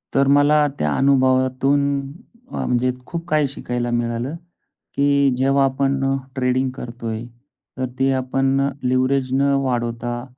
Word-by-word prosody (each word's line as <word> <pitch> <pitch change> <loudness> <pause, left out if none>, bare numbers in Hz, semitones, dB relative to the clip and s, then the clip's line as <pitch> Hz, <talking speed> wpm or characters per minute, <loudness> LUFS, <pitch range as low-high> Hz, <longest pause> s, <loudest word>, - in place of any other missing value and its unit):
तर 135 0 +4
मला 150 +1 +4
त्या 75 - 0
अनुभवातून 135 +1 +2 0.5
अ, - - -3
म्हणजे 125 +1 +1
खूप 170 +2 -6
काही 150 -3 +2
शिकायला 125 -3 -4
मिळालं; 120 +4 -2 0.6
की 140 0 +3
जेव्हा 135 +2 +2
आपण 135 0 0 0.3
ट्रेडिंग 130 0 0
करतोय 120 -3 -6 0.6
तर 130 - -1
ती 135 0 +2
आपण 135 +1 +1
लिव्हरेज 130 +1 +1
न 135 +1 +2 0.2
वाढवता 120 -1 -2
130 Hz, 120 wpm, -21 LUFS, 125-140 Hz, 0.6 s, तर